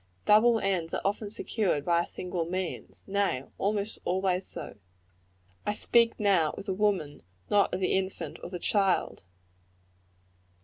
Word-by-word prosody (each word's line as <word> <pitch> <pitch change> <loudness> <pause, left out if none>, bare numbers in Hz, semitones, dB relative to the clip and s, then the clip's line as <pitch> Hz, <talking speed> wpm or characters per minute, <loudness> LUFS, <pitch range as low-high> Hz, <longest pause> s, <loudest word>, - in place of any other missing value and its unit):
Double 225 +2 +5
ends 185 -5 -1
are - - -2
often 205 +1 -1
secured 205 -8 -1
by 170 0 +3
single 180 -1 -4
means; 180 +1 -5
nay, 195 -10 0 0.2
almost 205 +1 -1
always 185 0 0
so. - - -5 0.9
I 210 - -1
speak 235 +1 +3
now 190 -7 +3
of 200 - -7
the 195 - -1
woman, 195 -7 +1
and 145 - -17 0.3
not 205 -1 +4
of - - -2
the 185 - +1
infant 180 -5 -3
or - - -7
the 180 - -5
child. 195 +1 +1
190 Hz, 145 wpm, -29 LUFS, 175-205 Hz, 0.9 s, Double